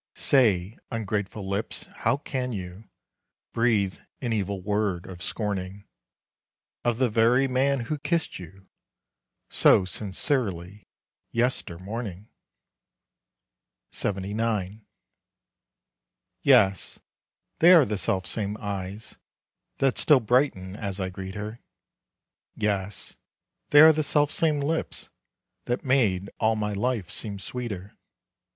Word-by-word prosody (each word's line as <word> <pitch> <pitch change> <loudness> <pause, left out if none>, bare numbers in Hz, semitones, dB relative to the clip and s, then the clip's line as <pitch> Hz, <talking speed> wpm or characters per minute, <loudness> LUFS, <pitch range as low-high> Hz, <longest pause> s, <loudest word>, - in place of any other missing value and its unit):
Say, 110 -6 +2
ungrateful 105 -3 -3
lips, 100 +3 -2
how - - +1
can 130 -3 -3
you 95 +1 -7 0.7
Breathe 110 -5 +1 0.2
an 120 -3 -2
evil 100 -2 -2
word 100 -2 -1
of 90 -1 -10
scorning, 100 -1 -4 1.0
Of 120 -2 +1
the 130 0 +3
very 120 +4 +3
man 135 +1 +1
who 145 +6 -3
kissed 170 - -1
you 95 +2 -13 0.8
So 95 - +5
sincerely, 100 - -1 0.4
yestermorning? 105 -3 -3 1.6
LXXIX. 105 +1 -2 1.6
Yes, 100 - +3 0.6
they 170 +2 +7
are 165 -6 +8
the 105 -2 -2
self 95 -1 0
same 105 -1 -1
eyes 100 +1 -6 0.6
That 135 -2 +1
still 150 -4 +5
brighten 110 -6 +1
as 100 -2 -4
I 95 -1 -2
greet 95 +1 -7
her, 105 +3 -6 1.0
Yes, 100 -1 -1 0.5
they 145 - +8
are 160 0 +9
the 155 - 0
self 145 0 +2
same 155 -3 +1
lips 160 +3 -3 0.5
That 120 +5 -2
made 105 -8 +2
all 110 0 +2
my 105 -1 -2
life 105 -3 -1
seem 100 -2 -4
sweeter. 100 -3 -6
105 Hz, 105 wpm, -26 LUFS, 95-125 Hz, 1.6 s, are